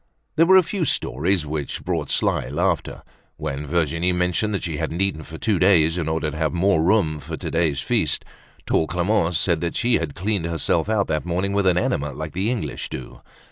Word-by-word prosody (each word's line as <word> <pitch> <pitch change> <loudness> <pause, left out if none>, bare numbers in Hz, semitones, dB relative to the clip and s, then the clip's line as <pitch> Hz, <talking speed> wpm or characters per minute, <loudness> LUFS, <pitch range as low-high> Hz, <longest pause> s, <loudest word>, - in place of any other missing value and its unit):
There 165 +1 +4
were 190 +1 +8
a 185 - +6
few 190 +1 -2
stories 85 - 0
which 75 -1 -4
brought - - -2
sly - - +1
laughter. 85 +4 -1 0.3
When 70 +2 -4
Virginie 85 +2 +1
mentioned 90 +4 0
that - - -3
she 80 -3 -3
hadn't 80 +2 -3
eaten 95 -5 0
for 80 +2 -9
two 105 -1 0
days 85 -3 +4
in 85 -3 -2
order 80 -1 -1
to 80 - -7
have 80 -1 0
more 90 -1 +2
room 85 -5 +2
for - - -6
today's 80 -4 0
feast, - - 0 0.4
tall 80 - +1
Clemence 90 -1 +1
said 85 -2 +1
that 85 0 -2
she 120 0 +2
had 80 -4 -4
cleaned 100 -2 -1
herself 85 +4 0
out 105 -3 +2
that 75 -1 0
morning 90 +3 -1
with 100 -1 +2
an 90 -1 +4
enema 75 -4 0
like 80 +3 -6
the 95 +5 0
English 105 - -3
do. 65 - -8
85 Hz, 205 wpm, -22 LUFS, 80-100 Hz, 0.4 s, were